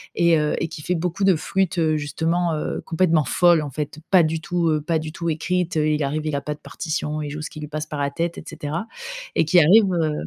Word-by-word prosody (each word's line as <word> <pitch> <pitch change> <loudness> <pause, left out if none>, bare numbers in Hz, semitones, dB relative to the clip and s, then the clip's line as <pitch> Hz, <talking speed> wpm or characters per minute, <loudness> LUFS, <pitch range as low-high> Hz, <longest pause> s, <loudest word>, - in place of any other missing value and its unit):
et 170 -2 +4
heu, 150 0 0
et - - -1
qui 160 -1 -9
fait 180 +4 -1
beaucoup 175 +3 -2
de 190 -3 +5
flûte, 190 +2 -1
heu, 160 -2 +2
justement, 160 +3 0
heu, 150 - -3
complètement 165 -2 +2
folle, 175 +3 +4
en 145 - -4
fait. 150 +2 -5
Pas 185 -3 +6
du 160 0 -1
tout, 175 -1 0
heu, 155 -1 +1
pas 165 +2 -1
du 155 0 -6
tout 170 0 -3
écrite, 180 +3 -1
heu, 155 0 +2
il 150 0 +1
arrive, 150 +3 -2
il 155 -2 -1
a - - -3
pas 150 +2 -3
de 150 - -15
partition, 155 -2 -4
il 150 - -4
joue 150 +2 -6
ce 155 - -5
qui 155 - -10
lui 150 - -6
passe 155 +1 -4
par 150 -1 -6
la 140 0 0
tête 170 +3 -2
et - - -7
cetera, 165 +9 -4 0.5
et - - +4
qui 175 +3 +5
arrive 190 +5 +6
heu 160 -3 +1
160 Hz, 270 wpm, -22 LUFS, 150-175 Hz, 0.5 s, Pas